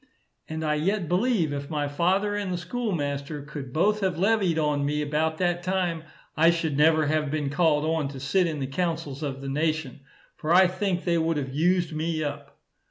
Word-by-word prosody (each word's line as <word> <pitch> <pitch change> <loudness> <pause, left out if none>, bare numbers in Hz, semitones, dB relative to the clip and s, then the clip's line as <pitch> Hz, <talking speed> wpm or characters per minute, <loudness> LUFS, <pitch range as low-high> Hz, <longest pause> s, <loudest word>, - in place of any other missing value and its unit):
And 160 0 -4
I 150 - +1
yet 175 +4 0
believe, 180 - +1
if 140 0 -5
my 150 -2 -1
father 185 +8 +1
and 205 -2 -2
the 180 - -1
schoolmaster 155 - -3
could 145 -3 -8
both 205 +9 +2
have 190 -4 -1
levied 195 -3 +2
on 150 -2 +1
me 150 +1 0
about 155 +2 0
that 175 0 0
time, 175 -3 -1 0.3
I 165 +2 +5
should 165 -3 0
never 155 +1 +4
have 150 0 0
been 145 -2 -2
called 150 -1 +2
on 160 -2 0
to 135 -1 -8
sit 175 +7 +2
in 160 -2 -3
the 135 - -2
councils 160 -1 -3
of 135 -3 -4
the 135 - -6
nation, 155 -1 -1 0.4
for 155 - -3
I 185 +2 +7
think 185 0 -1
they 170 -2 +1
would 165 -1 0
have 135 -2 -3
used 175 +2 +1
me 155 0 -1
up. 145 - -6
160 Hz, 200 wpm, -26 LUFS, 150-180 Hz, 0.4 s, I